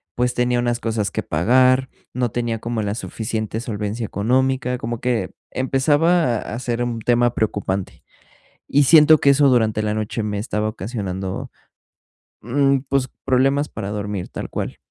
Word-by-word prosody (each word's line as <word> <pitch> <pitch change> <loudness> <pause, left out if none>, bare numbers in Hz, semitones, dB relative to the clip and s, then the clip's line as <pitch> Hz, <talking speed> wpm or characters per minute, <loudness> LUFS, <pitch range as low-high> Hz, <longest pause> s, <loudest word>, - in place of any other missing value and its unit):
pues, 125 0 0
tenía 125 0 +1
unas 120 0 -1
cosas 110 -3 -1
que - - -3
pagar, 130 +10 +3 0.2
no 125 -2 -1
tenía 120 -1 -2
como 115 0 -3
la 105 0 -2
suficiente 110 -1 -4
solvencia 110 0 -3
económica, 125 +5 0
como 120 -1 -4
que 125 -2 -1 0.2
empezaba 135 +2 +2
a 110 +2 -5
ser 120 -1 -2
un 120 -1 -3
tema 120 +1 +2
preocupante 100 -4 -2 0.6
y 145 +1 +3
siento 155 +2 +7
que 140 - +4
eso 140 0 +5
durante 110 -4 +2
la 105 0 -1
noche 110 +1 -3
me 105 -1 -2
estaba 105 0 -2
ocasionando, 95 -3 -5 0.9
mm, 135 +4 +2
pues, 135 -1 0 0.2
problemas 135 +3 +2
para 100 - -5
dormir, 105 -2 -4
tal - - -6
cual. - - -4
120 Hz, 155 wpm, -21 LUFS, 105-130 Hz, 0.9 s, siento